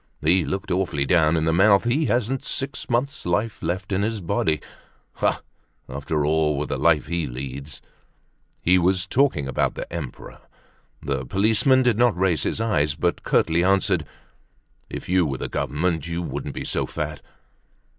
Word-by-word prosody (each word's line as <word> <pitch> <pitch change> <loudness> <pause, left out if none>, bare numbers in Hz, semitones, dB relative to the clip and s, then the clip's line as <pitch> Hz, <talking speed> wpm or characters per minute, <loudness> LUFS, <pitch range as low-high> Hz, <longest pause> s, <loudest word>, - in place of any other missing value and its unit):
He 85 +4 +4
looked 95 +1 -4
awfully 90 -6 0
down 80 0 +3
in 80 - 0
the 80 - +2
mouth. 100 +3 +5
He 130 +7 +1
hasn't 120 +3 0
six 135 0 -3
months' 140 +5 -1
life 100 +5 -1
left 90 +4 -3
in 95 0 +1
his 110 +1 -1
body. 80 -3 0 0.6
Ah! - - +1 0.4
after 70 +3 -2
all, 75 -1 +2
with 75 - -3
the - - -2
life 80 -3 +3
he 85 0 -2
leads—" 65 +3 -7 0.8
He 90 +2 +5
was 95 +1 +2
talking 130 - +1
about 70 - 0
the - - -5
Emperor. 75 -7 -7 0.6
The 70 -2 -2
policeman 110 - +3
did 120 -3 +2
not 120 -6 +3
raise 90 -5 +2
his - - -1
eyes, 75 -11 +1
but 85 +2 -1
curtly 85 +1 +2
answered: 95 -4 +2 0.8
"If - - -7
you 90 0 +3
were 70 -4 -2
the - - -4
Government 80 +2 -1
you 85 +1 -3
wouldn't 70 -2 -5
be - - -4
so - - -1
fat." - - -4
85 Hz, 165 wpm, -23 LUFS, 75-105 Hz, 0.8 s, mouth